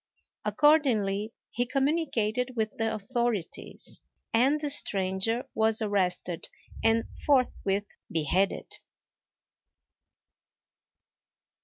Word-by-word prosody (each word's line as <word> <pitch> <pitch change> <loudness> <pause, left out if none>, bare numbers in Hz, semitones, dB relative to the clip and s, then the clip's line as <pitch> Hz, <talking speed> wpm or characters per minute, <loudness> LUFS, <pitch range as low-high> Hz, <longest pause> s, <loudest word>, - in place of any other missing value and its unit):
Accordingly, 225 -9 +3 0.2
he 245 +1 -1
communicated 255 -4 0
with 220 -2 0
the 225 -3 -1
authorities, 220 -2 -3 0.3
and 265 +6 +4
the 295 -1 +2
stranger 195 0 +1
was 220 0 +2
arrested 185 -5 -1 0.3
and 225 0 +3 0.2
forthwith 210 -7 +2 0.3
beheaded. 170 +5 0
225 Hz, 70 wpm, -28 LUFS, 200-255 Hz, 0.3 s, and